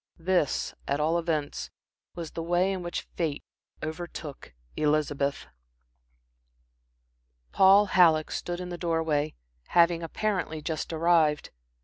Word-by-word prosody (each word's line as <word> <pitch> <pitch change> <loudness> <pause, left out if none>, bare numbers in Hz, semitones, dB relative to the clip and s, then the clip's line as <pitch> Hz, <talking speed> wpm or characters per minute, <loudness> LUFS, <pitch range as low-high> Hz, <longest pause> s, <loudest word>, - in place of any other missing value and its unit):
This, 175 -4 0
at 140 +1 0
all 160 +3 +2
events, 155 -4 -2 0.5
was 170 -3 -6
the 165 - -5
way 175 +3 +1
in 185 - -4
which 175 0 -4
fate 155 -4 -2 0.4
overtook 155 - -7 0.2
Elizabeth. 145 -2 0 2.1
Paul 195 +2 +6
Halleck 165 -5 +4
stood 175 0 -4
in 180 0 -6
the 175 -1 -6
door 165 -2 0
way, 150 -1 -1 0.3
having 170 -1 +4
apparently 180 -1 -2
just 155 +2 -4
arrived. 160 -2 +2
165 Hz, 115 wpm, -27 LUFS, 155-175 Hz, 2.1 s, Paul